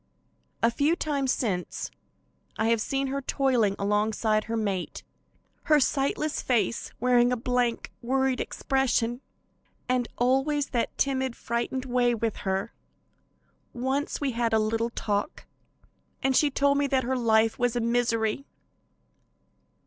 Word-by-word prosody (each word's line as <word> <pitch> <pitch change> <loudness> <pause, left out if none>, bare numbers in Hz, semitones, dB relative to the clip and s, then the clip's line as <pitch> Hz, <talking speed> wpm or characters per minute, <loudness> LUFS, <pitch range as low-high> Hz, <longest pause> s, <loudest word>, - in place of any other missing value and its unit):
A 230 - +5
few 290 +7 +2
times 280 -6 -1
since, 185 -7 -2 0.7
I 220 +1 +1
have 230 -1 +2
seen 270 +4 -1
her 275 +1 -2
toiling 250 -7 +1
along 210 +2 +1
beside 215 -1 0
her 230 0 -2
mate, 200 -5 -3 0.6
her 300 -1 +5
sightless 280 +3 0
face 230 -3 0
wearing 245 -1 +4
a 250 - +1
blank, 245 0 -1
worried 265 +1 +1
expression, 245 -2 0 0.7
and 250 -1 +1
always 270 +4 +1
that 240 -2 -2
timid, 265 -3 0
frightened 240 +3 -3
way 245 -1 +2
with 225 -1 -2
her. 195 +3 -2 1.0
Once 265 +4 -2
we 280 -2 -1
had 230 -1 -1
a - - +5
little 225 +2 0
talk, 210 +2 -3 0.8
and 265 -1 +2
she 295 - +4
told 280 +1 +2
me 285 - +2
that 265 -1 +1
her 260 +2 -1
life 225 -2 +2
was 245 -1 +1
a - - +1
misery. 235 +1 0
245 Hz, 135 wpm, -27 LUFS, 225-270 Hz, 1.0 s, A